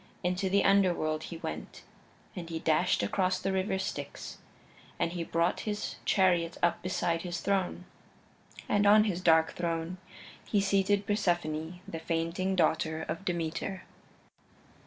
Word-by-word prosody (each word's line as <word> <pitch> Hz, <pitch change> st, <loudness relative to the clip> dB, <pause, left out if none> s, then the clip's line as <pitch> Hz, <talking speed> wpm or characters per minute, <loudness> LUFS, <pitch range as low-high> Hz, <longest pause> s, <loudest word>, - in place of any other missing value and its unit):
Into 180 Hz, +2 st, 0 dB
the 200 Hz, +1 st, +3 dB
Underworld 175 Hz, -6 st, +2 dB
he 170 Hz, -, -7 dB
went, -, -, -7 dB, 0.5 s
and 170 Hz, -3 st, -6 dB
he 165 Hz, -, -3 dB
dashed 160 Hz, +3 st, +2 dB
across 185 Hz, -1 st, +1 dB
the 195 Hz, -, -1 dB
River 190 Hz, 0 st, 0 dB
Styx, 145 Hz, -7 st, -5 dB, 0.6 s
and 170 Hz, -, 0 dB
he 175 Hz, -1 st, -3 dB
brought 170 Hz, +1 st, 0 dB
his 210 Hz, 0 st, -3 dB
chariot 175 Hz, -3 st, +2 dB
up 170 Hz, -1 st, +2 dB
beside 170 Hz, -2 st, -1 dB
his 175 Hz, -1 st, -4 dB
throne. 185 Hz, -1 st, -1 dB, 0.8 s
And 205 Hz, 0 st, +3 dB
on 215 Hz, +1 st, +7 dB
his 190 Hz, -4 st, -1 dB
dark 160 Hz, -2 st, +4 dB
throne 170 Hz, +1 st, -3 dB, 0.4 s
he 205 Hz, -, +1 dB
seated 200 Hz, 0 st, +2 dB
Persephone, 175 Hz, -5 st, -1 dB
the 165 Hz, -, -5 dB
fainting 165 Hz, +3 st, -1 dB
daughter 160 Hz, -2 st, +1 dB
of 170 Hz, -, -5 dB
Demeter. 175 Hz, +1 st, -3 dB
175 Hz, 135 wpm, -30 LUFS, 165-190 Hz, 0.8 s, on